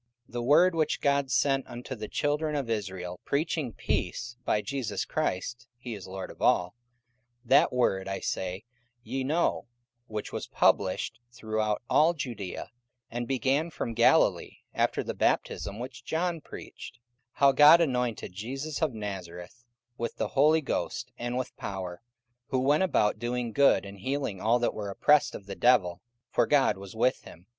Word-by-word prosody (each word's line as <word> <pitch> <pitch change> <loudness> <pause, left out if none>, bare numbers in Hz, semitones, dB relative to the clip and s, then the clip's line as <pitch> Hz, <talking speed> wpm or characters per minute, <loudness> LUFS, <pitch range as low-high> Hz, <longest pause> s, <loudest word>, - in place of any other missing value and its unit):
44:010:036 - - -25
The 120 - -2
word 150 +9 +5
which 155 -2 0
God 140 -1 +2
sent 135 +2 +2
unto 125 +1 -7
the 110 -3 -6
children 150 +4 -1
of 135 -5 -2
Israel, 95 -4 -4
preaching 145 -2 -1
peace 120 +3 -2
by 105 - +1
Jesus 135 +2 -3
Christ: 115 +5 -3
(he 120 -1 -7
is 100 -4 -8
Lord 95 0 -6
of - - -16
all:) 90 0 +3 0.7
44:010:037 - - -21
That - - +6
word, 95 -6 +1
I 95 0 -3
say, 95 +2 -3 0.4
ye 135 +1 -3
know, 150 -3 0 0.4
which 110 -1 -5
was - - -4
published 100 +4 +1
throughout 110 -2 -2
all 165 +3 +4
Judaea, 120 - -5 0.4
and 120 0 -3
began 135 +4 +1
from 120 -7 -4
Galilee, 115 +1 +3
after - - +1
the - - -4
baptism 100 +1 0
which 125 +3 -7
John 165 0 -1
preached; - - -10
44:010:038 - - -30 0.3
How 140 -1 +5
God 150 +5 +8
anointed 125 - -1
Jesus 135 +10 -5
of 150 -7 0
Nazareth 95 +1 -7 0.4
with 115 - -3
the - - -2
Holy 155 +3 +4
Ghost 140 - -3
and 120 +1 -2
with 130 -1 -4
power: 90 -3 -5 0.5
who 130 - -1
went 140 +5 +3
about 105 - +2
doing 120 0 -2
good, 140 -9 +4
and 100 0 -10
healing 130 -3 -3
all 115 +3 +3
that 120 - 0
were 105 -2 -5
oppressed 145 +8 +3
of 100 - -9
the 100 - -6
devil; 95 -8 +3 0.3
for - - +2
God 145 -2 +4
was 100 +1 -10
with 125 +3 +1
him. 85 - -14
120 Hz, 165 wpm, -28 LUFS, 100-140 Hz, 0.7 s, God